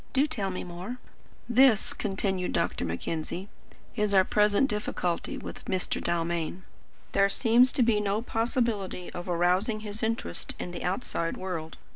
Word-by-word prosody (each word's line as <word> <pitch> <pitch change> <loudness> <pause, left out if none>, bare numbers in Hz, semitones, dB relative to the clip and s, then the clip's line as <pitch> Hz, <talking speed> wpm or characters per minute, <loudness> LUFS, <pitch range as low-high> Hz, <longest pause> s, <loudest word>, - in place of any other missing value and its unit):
"Do 270 +2 +4
tell 215 -11 -2
me 185 - -4
more." 180 +7 -6 0.5
"This," 245 -2 +5
continued 195 -2 -1
Dr. - - 0
Mackenzie, 160 - -3 0.5
"is 210 -3 +1
our 190 - +7
present 210 +6 +3
difficulty 195 -5 -2
with - - -8
Mr. 185 -1 -1
Dalmain. 170 +1 -1 0.5
There 200 0 +4
seems 240 +4 +5
to 265 - +4
be 225 -3 +3
no 205 +1 +1
possibility 225 -6 -1
of 175 +1 -6
arousing 180 +6 +2
his 210 0 -4
interest 220 - -2
in 180 - -5
the 175 - -6
outside 180 -3 -1
world. 165 -4 -5
195 Hz, 145 wpm, -28 LUFS, 175-225 Hz, 0.5 s, our